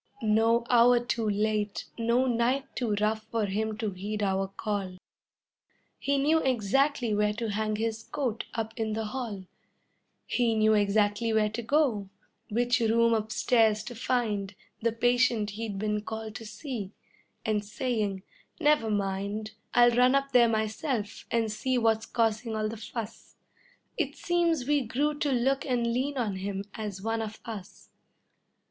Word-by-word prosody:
No 225 Hz, +2 st, +3 dB
hour 240 Hz, 0 st, +6 dB
too 235 Hz, -2 st, -1 dB
late, 210 Hz, -2 st, 0 dB
no 235 Hz, +2 st, +2 dB
night 250 Hz, +3 st, +1 dB
too 230 Hz, -5 st, 0 dB
rough 215 Hz, +1 st, +1 dB
for 220 Hz, -1 st, -1 dB
him 215 Hz, +2 st, -2 dB
to 220 Hz, -3 st, -2 dB
heed 205 Hz, +3 st, -4 dB
our 195 Hz, 0 st, +1 dB
call; 195 Hz, -2 st, -4 dB, 1.0 s
He 280 Hz, 0 st, +1 dB
knew 305 Hz, +4 st, +3 dB
exactly 255 Hz, 0 st, +1 dB
where 210 Hz, 0 st, +2 dB
to 225 Hz, 0 st, -3 dB
hang 215 Hz, +1 st, -1 dB
his 225 Hz, +1 st, -2 dB
coat 245 Hz, -3 st, -3 dB
up 225 Hz, -1 st, -3 dB
in 220 Hz, -2 st, -1 dB
the 220 Hz, 0 st, -2 dB
hall; 215 Hz, -5 st, -5 dB, 0.8 s
He 235 Hz, -2 st, +1 dB
knew 215 Hz, 0 st, +4 dB
exactly 205 Hz, +2 st, +2 dB
where 215 Hz, -1 st, +2 dB
to 235 Hz, -, -3 dB
go, 235 Hz, -6 st, +1 dB, 0.4 s
which 245 Hz, +3 st, +2 dB
room 230 Hz, 0 st, +3 dB
upstairs 220 Hz, 0 st, +2 dB
to 245 Hz, -, -7 dB
find 215 Hz, -5 st, -1 dB, 0.3 s
The 230 Hz, +1 st, +2 dB
patient 240 Hz, -2 st, +2 dB
he'd 210 Hz, -1 st, -5 dB
been 210 Hz, +1 st, -1 dB
called 220 Hz, 0 st, -6 dB
to 225 Hz, -, -9 dB
see, 220 Hz, -6 st, -6 dB, 0.5 s
and 215 Hz, -1 st, +1 dB
saying: 210 Hz, -3 st, -2 dB, 0.4 s
"Never 295 Hz, -6 st, +3 dB
mind, 200 Hz, +1 st, -2 dB, 0.2 s
I'll 240 Hz, 0 st, +7 dB
run 250 Hz, +2 st, +4 dB
up 275 Hz, 0 st, +1 dB
there 240 Hz, -2 st, +6 dB
myself 220 Hz, 0 st, -2 dB
and 225 Hz, -2 st, +1 dB
see 255 Hz, +4 st, 0 dB
what's 225 Hz, -1 st, +2 dB
causing 225 Hz, 0 st, 0 dB
all 215 Hz, 0 st, 0 dB
the 225 Hz, -, -5 dB
fuss." 225 Hz, 0 st, -7 dB, 0.6 s
It -, -, -1 dB
seems 340 Hz, -6 st, +1 dB
we 295 Hz, -1 st, +3 dB
grew 275 Hz, +5 st, 0 dB
to 290 Hz, -, +1 dB
look 265 Hz, +2 st, +1 dB
and 245 Hz, -3 st, 0 dB
lean 270 Hz, +3 st, -1 dB
on 210 Hz, -6 st, -1 dB
him 195 Hz, +1 st, -3 dB
as 205 Hz, -3 st, -5 dB
one 225 Hz, 0 st, -1 dB
of 215 Hz, 0 st, -6 dB
us. 210 Hz, -5 st, -9 dB
225 Hz, 155 wpm, -28 LUFS, 210-245 Hz, 1.0 s, I'll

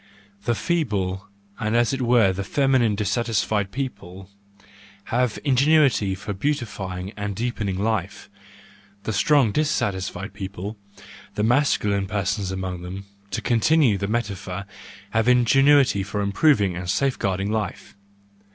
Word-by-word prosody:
—The 120 Hz, -, +1 dB
feeble 105 Hz, -, -1 dB, 0.3 s
and 110 Hz, +1 st, -1 dB
as 120 Hz, +2 st, +2 dB
it 135 Hz, -, -2 dB
were 120 Hz, -6 st, +4 dB
feminine 120 Hz, +3 st, +1 dB
dissatisfied 105 Hz, -1 st, 0 dB
people 95 Hz, -8 st, -6 dB, 0.8 s
have 125 Hz, -2 st, +1 dB
ingenuity 135 Hz, -7 st, +3 dB
for 100 Hz, +2 st, -5 dB
beautifying 100 Hz, -7 st, -3 dB
and 105 Hz, -1 st, -4 dB
deepening 110 Hz, -4 st, -2 dB
life; 105 Hz, -2 st, -2 dB, 0.8 s
the 110 Hz, -, -2 dB
strong 135 Hz, +1 st, +3 dB
dissatisfied 100 Hz, -, -1 dB
people—the 100 Hz, +1 st, -8 dB
masculine 105 Hz, -6 st, +2 dB
persons 100 Hz, -1 st, -1 dB
among 95 Hz, -2 st, -4 dB
them, 95 Hz, +2 st, -7 dB, 0.2 s
to 110 Hz, -, -4 dB
continue 120 Hz, -1 st, +3 dB
the 100 Hz, -, -2 dB
metaphor—have 100 Hz, 0 st, -4 dB
the 125 Hz, -, +5 dB
ingenuity 135 Hz, -1 st, +4 dB
for 105 Hz, +1 st, -3 dB
improving 100 Hz, -, +2 dB
and 90 Hz, 0 st, -5 dB
safeguarding 100 Hz, -6 st, 0 dB
life. 110 Hz, -1 st, -4 dB
105 Hz, 115 wpm, -23 LUFS, 95-125 Hz, 0.8 s, the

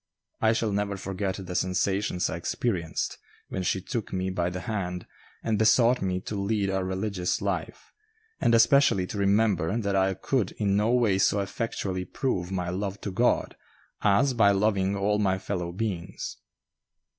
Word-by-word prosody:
I 110 Hz, 0 st, +4 dB
shall 110 Hz, -1 st, 0 dB
never 100 Hz, 0 st, -1 dB
forget 95 Hz, 0 st, -3 dB
the 90 Hz, -, -6 dB
sensations 95 Hz, +1 st, 0 dB
I -, -, -3 dB
experienced 85 Hz, -2 st, -2 dB, 0.3 s
when 95 Hz, -, -3 dB
she 95 Hz, +1 st, 0 dB
took 115 Hz, +2 st, -4 dB
me 95 Hz, 0 st, -1 dB
by 90 Hz, -1 st, 0 dB
the 90 Hz, +1 st, -5 dB
hand 90 Hz, -3 st, -3 dB, 0.4 s
and 110 Hz, -2 st, 0 dB
besought 115 Hz, +3 st, +4 dB
me 95 Hz, -1 st, 0 dB
to -, -, -6 dB
lead 100 Hz, -1 st, 0 dB
a 95 Hz, 0 st, 0 dB
religious 95 Hz, -1 st, -1 dB
life, -, -, -4 dB, 0.5 s
and 115 Hz, -, +3 dB
especially 115 Hz, -5 st, +5 dB
to 100 Hz, -, -5 dB
remember 100 Hz, -2 st, +2 dB
that 100 Hz, -4 st, -1 dB
I 95 Hz, 0 st, +2 dB
could 105 Hz, +2 st, -1 dB
in 100 Hz, -2 st, 0 dB
no 105 Hz, +3 st, +2 dB
way 115 Hz, -6 st, +3 dB
so 100 Hz, -, +3 dB
effectually 100 Hz, -2 st, -3 dB
prove 95 Hz, -9 st, -2 dB
my 90 Hz, -2 st, -2 dB
love 100 Hz, +2 st, -3 dB
to 100 Hz, -, -4 dB
God 120 Hz, +6 st, +1 dB, 0.5 s
as 105 Hz, +7 st, +3 dB
by 110 Hz, -4 st, +5 dB
loving 100 Hz, -1 st, +2 dB
all 105 Hz, +1 st, +1 dB
my 95 Hz, -2 st, +2 dB
fellow 90 Hz, -3 st, -3 dB
beings. 95 Hz, -3 st, -4 dB
100 Hz, 165 wpm, -27 LUFS, 95-110 Hz, 0.5 s, especially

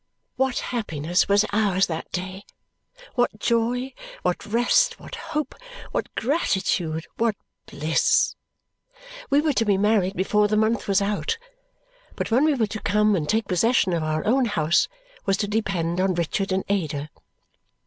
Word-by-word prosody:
What 265 Hz, -1 st, 0 dB, 0.2 s
happiness 175 Hz, -6 st, 0 dB
was 205 Hz, +1 st, +4 dB
ours 200 Hz, -3 st, +3 dB
that 160 Hz, -1 st, -5 dB
day, 185 Hz, +2 st, -5 dB, 0.7 s
what 245 Hz, -3 st, +1 dB
joy, 240 Hz, +4 st, 0 dB, 0.3 s
what 180 Hz, +3 st, -1 dB
rest, 245 Hz, -, +2 dB
what -, -, -12 dB
hope, 310 Hz, -2 st, -3 dB, 0.4 s
what -, -, -2 dB
gratitude, 190 Hz, -, 0 dB
what 230 Hz, -2 st, +1 dB, 0.3 s
bliss! 155 Hz, +3 st, +2 dB, 1.0 s
We 285 Hz, +1 st, +4 dB
were 305 Hz, -1 st, +1 dB
to 230 Hz, -, +2 dB
be 205 Hz, -3 st, +2 dB
married 200 Hz, -2 st, +2 dB
before 210 Hz, +3 st, +2 dB
the 215 Hz, +1 st, +1 dB
month 220 Hz, +2 st, +1 dB
was 200 Hz, 0 st, +3 dB
out, 210 Hz, -, -1 dB, 0.8 s
but -, -, -3 dB
when 255 Hz, +6 st, +4 dB
we 310 Hz, -2 st, +3 dB
were 230 Hz, -4 st, +2 dB
to 215 Hz, +1 st, -6 dB
come 210 Hz, +1 st, +3 dB
and 150 Hz, -5 st, -2 dB
take 220 Hz, -1 st, +1 dB
possession 195 Hz, 0 st, +2 dB
of 170 Hz, -, 0 dB
our 155 Hz, 0 st, -1 dB
own 255 Hz, +4 st, +3 dB
house 170 Hz, -6 st, +2 dB, 0.4 s
was 195 Hz, -, +3 dB
to 205 Hz, -, -1 dB
depend 185 Hz, -5 st, -1 dB
on 190 Hz, -1 st, +1 dB
Richard 175 Hz, +3 st, -1 dB
and 190 Hz, 0 st, +1 dB
Ada. 155 Hz, -7 st, -2 dB
205 Hz, 155 wpm, -24 LUFS, 180-230 Hz, 1.0 s, was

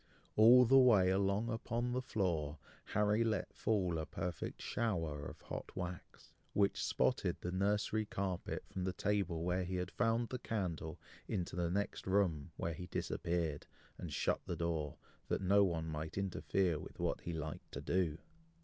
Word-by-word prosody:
All 120 Hz, +4 st, +8 dB
the 135 Hz, +3 st, +7 dB
way 105 Hz, -8 st, +6 dB
along 100 Hz, +4 st, +1 dB
upon 120 Hz, +2 st, -1 dB
the 125 Hz, +1 st, 0 dB
floor, 85 Hz, -, -1 dB, 0.3 s
Harry 105 Hz, +2 st, +2 dB
let 110 Hz, -4 st, -1 dB
fall 95 Hz, -6 st, +1 dB
a 80 Hz, -, -4 dB
perfect 85 Hz, -1 st, -4 dB
shower 80 Hz, -11 st, -1 dB
of -, -, -10 dB
hot -, -, -7 dB
wax, 90 Hz, -1 st, -7 dB, 0.2 s
which 100 Hz, -1 st, +2 dB
spotted -, -, +1 dB
the 90 Hz, -, -3 dB
nursery 105 Hz, +3 st, +1 dB
carpet 95 Hz, -3 st, -3 dB
from 95 Hz, -, -5 dB
the 95 Hz, -, -1 dB
table 95 Hz, -5 st, 0 dB
where 90 Hz, +1 st, +1 dB
he 90 Hz, +1 st, -3 dB
had 90 Hz, 0 st, -2 dB
found 115 Hz, 0 st, +1 dB
the 125 Hz, -, -3 dB
candle 85 Hz, -7 st, -3 dB, 0.3 s
into 90 Hz, -5 st, -2 dB
the 85 Hz, -1 st, 0 dB
next 100 Hz, +2 st, -2 dB
room, 90 Hz, -7 st, +2 dB
where 85 Hz, -, -2 dB
he 90 Hz, +3 st, -7 dB
disappeared, 85 Hz, -4 st, -2 dB, 0.3 s
and -, -, -5 dB
shut -, -, +1 dB
the 90 Hz, -, -1 dB
door, 80 Hz, -3 st, -2 dB, 0.3 s
that -, -, 0 dB
no 100 Hz, +2 st, +5 dB
one 85 Hz, -4 st, 0 dB
might 80 Hz, +1 st, -4 dB
interfere 95 Hz, -3 st, 0 dB
with -, -, -10 dB
what -, -, -1 dB
he 85 Hz, -, -4 dB
liked 80 Hz, -1 st, -5 dB
to -, -, -5 dB
do. 85 Hz, -4 st, +1 dB
95 Hz, 165 wpm, -36 LUFS, 85-105 Hz, 0.3 s, All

